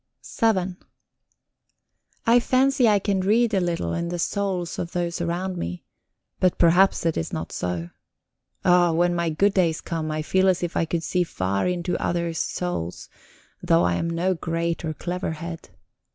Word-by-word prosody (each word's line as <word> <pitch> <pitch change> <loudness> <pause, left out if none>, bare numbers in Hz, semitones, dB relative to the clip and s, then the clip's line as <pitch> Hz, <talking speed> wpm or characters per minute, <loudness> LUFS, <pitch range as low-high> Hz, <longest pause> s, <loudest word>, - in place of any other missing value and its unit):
VII 190 -5 +2 1.5
I 235 +1 +6
fancy 260 +1 +3
I 210 - +5
can 200 -1 0
read 225 +4 +2
a 195 - +3
little 170 - -1
in 170 0 -2
the 175 - -3
souls 185 -1 -2
of 170 - -4
those 170 -1 -2
about 180 +2 -2
me 90 - -5 0.6
but 185 -1 +2
perhaps 175 +2 +4
it 165 - +1
is 80 - -3
not 80 +1 -4
so. 85 -1 -3 0.7
Oh, 175 -2 +5
when 175 +2 +2
my 170 -1 0
good 195 +6 +2
days 170 -5 +2
come, 160 -2 -4
I 155 0 -2
feel 190 +4 +2
as 180 -1 +1
if 175 - -3
I - - +2
could 165 0 -2
see 180 +1 +1
far 100 - -1
into 180 0 -1
others' 170 -1 -1
souls, 135 - -3 0.5
though 85 +1 +3
I 90 0 +2
am 165 - -1
no 175 +3 0
great 165 0 -2
or 155 -1 -3
clever 175 -1 -3
head. 165 - -7
175 Hz, 170 wpm, -24 LUFS, 165-185 Hz, 1.5 s, I